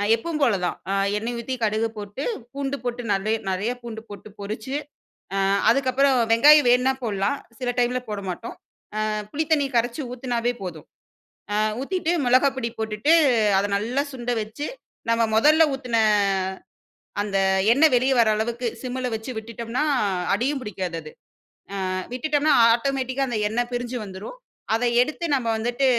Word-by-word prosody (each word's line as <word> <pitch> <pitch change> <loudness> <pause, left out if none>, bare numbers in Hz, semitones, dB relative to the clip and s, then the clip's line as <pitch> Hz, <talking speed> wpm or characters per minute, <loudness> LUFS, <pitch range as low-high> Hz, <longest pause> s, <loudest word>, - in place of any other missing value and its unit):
எப்பவும் 305 +7 -4
போல 235 - +4
தான் 175 - -1
அ - - +1 0.2
எண்ணெய் 230 +3 -3
ஊத்தி 255 +3 -3
கடுகு 220 +1 +1
போட்டு 205 +6 -6 0.3
பூண்டு 280 0 -3
போட்டு 245 0 -3
நல்லய 215 +3 0
நெறைய 190 +5 -1
பூண்டு 230 -2 -7
போட்டு 205 +1 -10
பொறிச்சு, 215 +6 -5 0.6
அ - - 0 0.3
அதுக்கப்புறம் 270 +2 +3 0.2
வெங்காயம் 290 +4 +7
வேணுனா 250 +2 +4
போடலாம் 205 +3 0 0.2
சில 250 -1 -1
டைம்ல 245 +1 +1
போட 210 -1 -3
மாட்டோம். 185 +6 -6 0.5
அ - - -1 0.2
புளி 315 +2 -1
தண்ணி 290 -3 +3
கரைச்சு 240 +5 0
ஊத்தினாவே 245 -1 -1
போதும். 165 -5 -7 0.7
அ - - 0 0.3
ஊத்திட்டு 345 +3 -1
மொளகாய் 255 +3 +4
பொடி 235 -2 -2
போட்டுட்டு 220 +7 +1 0.5
அதை 200 - 0
நல்லா 240 +7 -1
சுண்டை 245 -1 -2
வச்சு, 220 +8 -6 0.4
நம்ம 230 0 +2
மொதல்ல 305 +8 +6
ஊத்தின 250 -4 -2 1.3
அந்த 200 -1 -1 0.4
எண்ணெய் 295 0 +5
வெளியே 260 +2 +2
வர்ற 225 -2 +4
அளவுக்கு 235 +2 -2 0.2
சிம்மில 255 0 -3
வச்சு 220 +3 -7
விட்டுட்டோம்னா, 230 +4 -3 0.5
அடியும் 270 +6 -1
பிடிக்காது 185 -5 -4
அது 155 - -11 0.8
அ - - -1 0.2
விட்டுட்டோம்ன்னா 295 +3 +2 0.2
ஆட்டோமேட்டிக்கா 265 +1 -1
அந்த 230 -3 -1
எண்ணெய் 240 +2 -1
பிரிஞ்சு 245 0 -3
வந்துரும். 195 - -9 0.4
அதை 235 +2 +2
எடுத்து 305 +6 -2
நாம் 255 -4 0
வந்துட்டு 240 +4 0
240 Hz, 150 wpm, -24 LUFS, 220-270 Hz, 1.3 s, வெங்காயம்